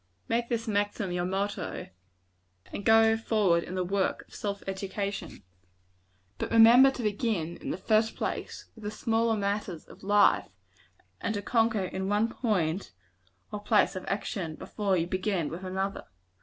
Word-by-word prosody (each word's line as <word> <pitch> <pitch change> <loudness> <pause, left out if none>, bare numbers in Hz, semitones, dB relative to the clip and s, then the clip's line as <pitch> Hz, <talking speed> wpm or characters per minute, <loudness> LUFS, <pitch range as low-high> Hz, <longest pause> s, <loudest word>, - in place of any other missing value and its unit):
Make 235 +1 0
this 230 -1 -2
maxim 205 -2 -1
your 175 0 -1
motto, 195 +2 -3 0.8
and 205 - -4
go 225 +1 +6
forward 210 -6 +2
in 180 - -6
the 185 - 0
work 195 +1 -1
of - - -20
self 200 -1 -4
education. 195 - -4 1.0
But - - -2
remember 235 +4 +8
to 265 -2 -5
begin, 205 -6 -1
in - - -7
the - - -2
first 220 +3 +2
place, - - -4
with 220 - -14
the 210 - -2
smaller 225 +1 +1
matters 200 -4 -2
of - - -15
life; 205 +1 +4 0.7
and 220 - -2
to 205 - -3
conquer 225 -3 +2
in 190 +1 -3
one 210 +2 +2
point 190 - -1 0.6
or 210 - -4
place 210 -1 +3
of 185 - -5
action, 190 -6 -3
before 200 +1 -1
you 165 - +1
begin 185 -2 -1
with 175 +3 -7
another. 190 +1 -3
205 Hz, 155 wpm, -29 LUFS, 190-225 Hz, 1.0 s, remember